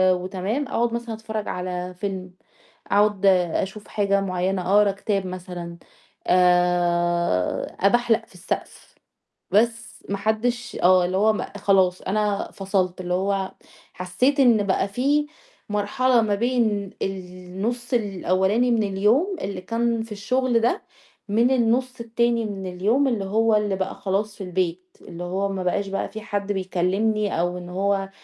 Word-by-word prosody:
وتمام، 190 Hz, +9 st, -3 dB
أقعد 235 Hz, -2 st, 0 dB
مثلًا 235 Hz, -1 st, -3 dB
أتفرّج 220 Hz, -1 st, -5 dB
على 180 Hz, 0 st, -4 dB
فيلم، 185 Hz, 0 st, -5 dB, 0.6 s
أقعد 205 Hz, -1 st, +2 dB
أشوف 190 Hz, +2 st, +1 dB
حاجة 200 Hz, -1 st, +1 dB
معيّنة 185 Hz, 0 st, -1 dB
أقرا 205 Hz, -1 st, +5 dB
كتاب 195 Hz, 0 st, -2 dB
مثلًا، 180 Hz, -2 st, -7 dB, 0.5 s
آآ 175 Hz, -, +2 dB
أبحلق 235 Hz, +3 st, +3 dB
في -, -, -22 dB
السقف، 180 Hz, +2 st, -6 dB, 0.6 s
بس 230 Hz, +2 st, +2 dB, 0.2 s
ما 200 Hz, -, -1 dB
حدش 240 Hz, +4 st, -1 dB
آه 180 Hz, 0 st, +6 dB
اللي 185 Hz, +1 st, -1 dB
هو 215 Hz, +2 st, +4 dB
م -, -, -2 dB
خلاص 190 Hz, -2 st, +2 dB
أنا 205 Hz, 0 st, -1 dB
فصلت، 190 Hz, -2 st, -1 dB
اللي 180 Hz, 0 st, -2 dB
هو 190 Hz, +1 st, 0 dB, 0.4 s
حسّيت 250 Hz, +11 st, 0 dB
إن 235 Hz, -6 st, +5 dB
بقى 195 Hz, 0 st, +1 dB
في 280 Hz, +8 st, +1 dB, 0.4 s
مرحلة 235 Hz, +4 st, +2 dB
ما 210 Hz, -2 st, +1 dB
بين 220 Hz, -3 st, 0 dB
النُص 190 Hz, +6 st, -4 dB
الأولاني 205 Hz, +1 st, +1 dB
من 225 Hz, -2 st, +2 dB
اليوم 210 Hz, -, +2 dB
اللي 195 Hz, -2 st, -4 dB
كان 230 Hz, +3 st, -1 dB
في 225 Hz, -, -13 dB
الشغل 245 Hz, +4 st, +1 dB
ده، 240 Hz, -, +1 dB, 0.5 s
من 230 Hz, +5 st, +3 dB
النُص 250 Hz, +1 st, +1 dB
التاني 235 Hz, 0 st, 0 dB
من 195 Hz, -3 st, -5 dB
اليوم 210 Hz, +10 st, +1 dB
اللي 225 Hz, -6 st, -1 dB
هو 220 Hz, +3 st, +2 dB
اللي 210 Hz, -2 st, +1 dB
بقى 190 Hz, 0 st, -3 dB
خلاص 205 Hz, +2 st, -2 dB
في -, -, -6 dB
البيت، 180 Hz, 0 st, -3 dB
اللي 175 Hz, +1 st, -8 dB
هو 190 Hz, +3 st, -1 dB
ما 190 Hz, -1 st, -3 dB
بقاش 195 Hz, +2 st, 0 dB
بقى 195 Hz, 0 st, -3 dB
في 220 Hz, -, -8 dB
حد 205 Hz, -1 st, -3 dB
بيكلّمني 195 Hz, +2 st, 0 dB
أو 175 Hz, +1 st, -1 dB
إن 175 Hz, 0 st, -8 dB
هو 195 Hz, +1 st, 0 dB
200 Hz, 145 wpm, -23 LUFS, 185-225 Hz, 0.6 s, آه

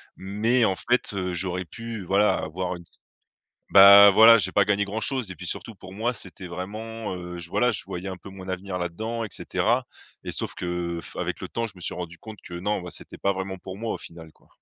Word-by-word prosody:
Mais 110 Hz, +6 st, +1 dB
en 95 Hz, -4 st, +2 dB
fait, 125 Hz, +5 st, 0 dB
heu, 90 Hz, -2 st, -2 dB
j'aurais 90 Hz, +1 st, -2 dB
pu 115 Hz, 0 st, -7 dB
voilà 100 Hz, +3 st, +3 dB
avoir 90 Hz, +3 st, -3 dB
une 85 Hz, -, -11 dB, 0.9 s
bah, 100 Hz, +1 st, +10 dB
voilà, 110 Hz, +3 st, +9 dB
j'ai 110 Hz, -, -1 dB
pas 100 Hz, -, +4 dB
gagné 105 Hz, 0 st, +2 dB
grand-chose 110 Hz, +2 st, -1 dB
et 95 Hz, -, -5 dB
puis 90 Hz, -, -8 dB
surtout, 115 Hz, -, -3 dB
pour 95 Hz, -1 st, -12 dB
moi, 115 Hz, +4 st, -1 dB
c'était 95 Hz, -4 st, -9 dB
vraiment, 105 Hz, +4 st, -5 dB
heu, 90 Hz, 0 st, -7 dB
j 85 Hz, -1 st, -7 dB
voilà, 125 Hz, +8 st, +2 dB
je 110 Hz, -, -2 dB
voyais 90 Hz, +2 st, -6 dB
un 95 Hz, -1 st, -6 dB
peu 100 Hz, -, -12 dB
mon 95 Hz, -1 st, -10 dB
avenir 95 Hz, 0 st, -4 dB
là-dedans, 110 Hz, +7 st, -3 dB
et 110 Hz, -, -5 dB
cetera. -, -, 0 dB, 0.4 s
Et -, -, -5 dB
sauf -, -, -3 dB
que, 90 Hz, -, -5 dB, 0.3 s
heu, -, -, -5 dB
f -, -, -12 dB
avec -, -, -3 dB
le -, -, -6 dB
temps, 115 Hz, 0 st, -2 dB
je 110 Hz, -, -7 dB
me 90 Hz, -, -15 dB
suis -, -, -1 dB
rendu 85 Hz, -1 st, -7 dB
compte 110 Hz, -2 st, -10 dB
que 85 Hz, -, -9 dB
non, 95 Hz, +3 st, -2 dB
bah, 90 Hz, -, -7 dB
c'était -, -, -7 dB
pas 100 Hz, -, +1 dB
vraiment 95 Hz, 0 st, -4 dB
pour 95 Hz, +1 st, -9 dB
moi 115 Hz, +1 st, -2 dB
au -, -, -6 dB
final, 85 Hz, -1 st, -11 dB
quoi. -, -, -29 dB
95 Hz, 240 wpm, -25 LUFS, 90-110 Hz, 0.9 s, bah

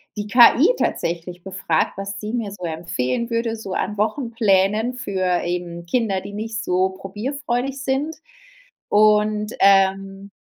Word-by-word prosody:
die 210 Hz, 0 st, -4 dB
KI 245 Hz, -, +6 dB
tatsächlich 175 Hz, +1 st, -3 dB
befragt, 185 Hz, -4 st, -1 dB
was 195 Hz, 0 st, -5 dB
sie 215 Hz, +3 st, -5 dB
mir 225 Hz, -4 st, -2 dB
so 180 Hz, -3 st, -7 dB
empfehlen 165 Hz, -, -2 dB
würde, 230 Hz, 0 st, -1 dB
so 200 Hz, -4 st, -7 dB
an 210 Hz, -, -2 dB
Wochenplänen 220 Hz, -1 st, +1 dB
für 185 Hz, -7 st, -1 dB
eben 175 Hz, -1 st, -4 dB
Kinder, 200 Hz, -3 st, 0 dB
die 200 Hz, +1 st, -9 dB
nicht 215 Hz, 0 st, -4 dB
so 185 Hz, -1 st, +1 dB
probierfreudig 245 Hz, +7 st, -4 dB
sind. 280 Hz, +3 st, -1 dB, 0.7 s
Und, 210 Hz, 0 st, +3 dB
ähm, 195 Hz, 0 st, +3 dB
205 Hz, 130 wpm, -21 LUFS, 190-230 Hz, 0.7 s, KI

